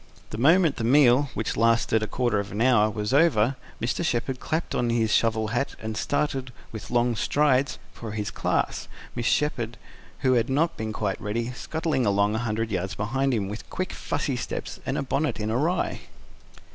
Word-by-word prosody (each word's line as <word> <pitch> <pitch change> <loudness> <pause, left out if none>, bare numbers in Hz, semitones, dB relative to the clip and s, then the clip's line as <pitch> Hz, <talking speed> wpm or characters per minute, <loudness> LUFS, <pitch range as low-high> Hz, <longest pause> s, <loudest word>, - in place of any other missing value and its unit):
The 110 - -5
moment 160 +3 +4
the - - -3
meal, 130 +2 +5
which 110 - -2
lasted 115 0 +3
a 110 - -1
quarter 120 -4 0
of 100 0 -4
an 100 - -4
hour, 115 -3 +4
was 105 +2 -3
over, 135 -5 +4 0.2
Mr. 120 +8 -1
Shepherd 130 -3 -1
clapped 160 +1 -2
on 120 - 0
his 115 -2 +1
shovel 110 -1 +2
hat 120 +5 -1
and 110 0 -5
started, 135 +1 -1 0.2
with 110 -2 -8
long 120 0 +2
strides, 140 +2 +2 0.2
for 110 -3 -7
his 105 -1 -3
class, - - -1 0.3
Mrs. 120 - -3
Shepherd, 120 -5 0 0.4
who 130 -1 +3
had 120 0 +2
not 165 +5 +1
been 110 0 -4
quite 105 -3 -2
ready, 115 +3 -2
scuttling 155 -1 -1
along 100 +1 +2
a 110 - 0
hundred 115 -1 -2
yards 95 0 -2
behind 135 +6 0
him, 105 -6 0
with 105 +3 -7
quick, 185 - -3
fussy 145 -2 -2
steps, 125 - -5
and 135 - -1
bonnet 140 -3 0
an 110 +1 -2
awry. 155 +10 0
120 Hz, 185 wpm, -26 LUFS, 110-135 Hz, 0.4 s, meal